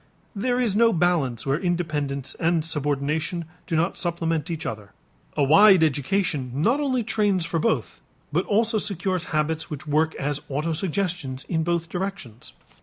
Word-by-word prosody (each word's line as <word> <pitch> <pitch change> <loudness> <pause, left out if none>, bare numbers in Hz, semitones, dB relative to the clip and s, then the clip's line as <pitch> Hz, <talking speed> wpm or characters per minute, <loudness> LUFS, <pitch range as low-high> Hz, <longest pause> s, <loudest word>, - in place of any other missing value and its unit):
There 245 +4 0
is 230 -6 +1
no 230 +1 +5
balance 165 - +1
where 140 +3 +1
independence 150 -6 -2
and 165 -1 +1
subordination 150 +2 -1 0.2
do 165 - -1
not 170 +4 0
supplement 165 -2 -1
each 160 -2 -4
other. 105 -2 -6 0.4
A 145 - +3
wide 190 +5 +7
education 150 -2 0
not 225 - +2
only 260 -4 0
trains 205 -5 +1
for 170 -1 -1
both 130 -6 -1 0.3
but 170 +5 +1
also 220 +1 +2
secures 185 -3 -2
habits 160 +1 -1
which 150 -2 -6
work 155 +2 +1
as 145 +1 -2
autosuggestions 160 -1 -2
in 160 -3 -1
both 170 0 -1
directions. 175 - -6
165 Hz, 150 wpm, -24 LUFS, 150-190 Hz, 0.4 s, wide